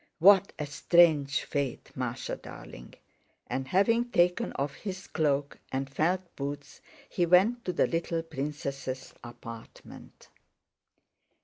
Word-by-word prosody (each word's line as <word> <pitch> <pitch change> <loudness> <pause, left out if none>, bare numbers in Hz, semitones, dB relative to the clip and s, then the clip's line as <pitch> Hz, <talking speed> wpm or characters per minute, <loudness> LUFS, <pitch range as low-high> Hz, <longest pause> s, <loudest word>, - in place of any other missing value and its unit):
"What 195 +3 +6
a 150 - -3
strange 145 -1 +4
fate, 140 -4 -3
Másha - - -4
darling!" - - -11 0.5
And 130 0 -3
having 230 - +3
taken 180 +3 +2
off 140 0 -2
his 190 +3 -6
cloak 145 -3 0
and 135 +1 -2
felt 175 +7 -1
boots, 140 0 -6 0.3
he 175 -4 0
went 205 +8 +4
to 180 - 0
the - - +2
little 165 0 -1
princess' 140 -3 -5
apartment. 115 -1 -11
150 Hz, 115 wpm, -29 LUFS, 140-180 Hz, 0.5 s, What